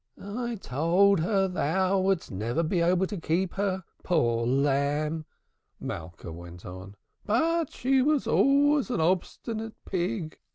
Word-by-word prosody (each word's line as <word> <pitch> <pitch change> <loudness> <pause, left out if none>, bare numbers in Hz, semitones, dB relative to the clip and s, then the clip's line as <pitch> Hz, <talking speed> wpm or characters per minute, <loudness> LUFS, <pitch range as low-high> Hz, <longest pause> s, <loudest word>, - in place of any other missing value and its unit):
"I 235 +4 -4
told 180 - +3
her 195 +3 +2
thou 185 +3 +1
wouldst 190 -2 0
never 115 - -1
be 175 +3 0
able 180 +2 +3
to 200 0 -5
keep 175 +4 0
her, 195 -1 -1 0.2
poor 120 -9 +1
lamb," 145 +4 +1 0.5
Malka 85 0 -7
went 85 +1 -10
on. 95 +2 -9 0.3
"But 320 +8 +1
she 265 +1 +2
was 295 +1 +2
always 285 0 +3
an 240 -7 -1
obstinate 215 +6 -1
pig. 180 -2 -3
180 Hz, 130 wpm, -27 LUFS, 145-210 Hz, 0.5 s, told